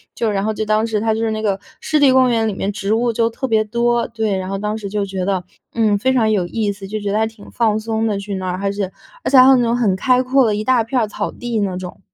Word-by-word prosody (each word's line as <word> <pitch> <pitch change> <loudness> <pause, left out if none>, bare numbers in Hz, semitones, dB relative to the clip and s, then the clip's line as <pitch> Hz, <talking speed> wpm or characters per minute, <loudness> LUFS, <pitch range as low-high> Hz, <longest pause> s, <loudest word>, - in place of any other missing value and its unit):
就 225 -2 0
然 195 0 -1
后 220 - +1
就 215 - -3
当 215 +1 +1
时 215 -2 -1
它 220 +1 +1
就 220 - -2
是 225 0 0
那 215 - -3
个 200 -2 0 0.2
湿 310 - +1
地 280 -2 +6
公 255 -1 +4
园 225 -1 +1
里 215 - -1
面 195 +1 -2
植 205 +1 -2
物 235 +1 +1
就 230 0 +1
特 265 +3 -4
别 220 -3 +2
多， 235 +2 0
对， 220 -3 -2
然 185 0 -4
后 195 - -2
当 210 +1 -2
时 205 -3 -6
就 205 0 -1
觉 190 -2 -4
得， 190 -2 -1 0.3
嗯， 215 -3 +2
非 260 +5 +1
常 225 -4 +2
有 185 -4 +1
意 210 +2 -1
思， 195 -1 -9
就 215 +2 -4
觉 200 - -2
得 210 - +1
还 220 - +2
挺 220 -2 -14
放 220 -3 +1
松 220 0 -1
的， 205 -2 -1
去 200 0 -5
那 185 -1 -4
儿。 180 0 -2
而 195 - +1
且 200 -2 -3 0.4
而 - - +1
且 270 - +5
还 255 - +9
有 270 - +7
那 245 - +2
种 235 0 +1
很 225 -6 +2
开 255 +4 +2
阔 260 0 +3
的 215 - +1
一 210 - -2
大 255 0 +3
片 250 +3 0
儿 - - +2
草 - - -3
地 240 -2 -3
那 195 -3 -1
种。 180 -1 -7
220 Hz, 335 characters per minute, -19 LUFS, 200-235 Hz, 0.4 s, 还